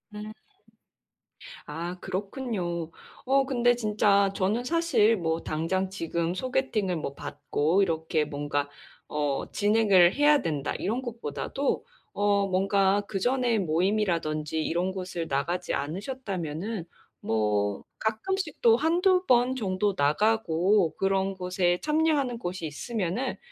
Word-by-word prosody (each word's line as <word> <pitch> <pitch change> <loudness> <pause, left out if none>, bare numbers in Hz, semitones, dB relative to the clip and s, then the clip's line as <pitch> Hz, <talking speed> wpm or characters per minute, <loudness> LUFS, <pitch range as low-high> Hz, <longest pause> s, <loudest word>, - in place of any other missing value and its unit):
음. 210 +1 -7 1.3
아, 170 +4 -5
그렇군요. 185 - -3 0.3
어, 270 +1 +3
근데 245 -2 +3
진짜 210 -3 +2
저는 210 +6 0
사실 315 -8 +3
뭐 165 -3 -1
'당장 175 +5 -1
지금 170 -2 -2
소개팅을 220 -5 -1
뭐, 150 -3 -4
받고 145 +5 -1
이렇게 160 -3 0
뭔가 145 -1 -2 0.4
어, 145 -2 -2
진행을 205 -4 +4
해야 295 0 +4
된다,' 150 -5 -2
이런 230 +5 -2
것보다도 235 - -3 0.3
어 205 -1 +2
뭔가 195 +1 +2
그전에 240 +3 +1
모임이라든지 165 -4 0
이런 175 +4 -1
곳을 180 -3 -4
나가지 170 +6 -1
않으셨다면은 185 - -4 0.4
뭐 105 -2 0 0.2
가끔씩 305 - -2
또 230 -1 +6
한두 360 +6 +2
번 250 +1 +3
정도 200 -3 0
나가고 185 +2 +2
그런 195 0 0
곳에 180 -1 0
참여하는 300 -5 +1
곳이 175 -5 -4
있으면은 210 - -3
195 Hz, 250 characters per minute, -27 LUFS, 165-230 Hz, 1.3 s, 또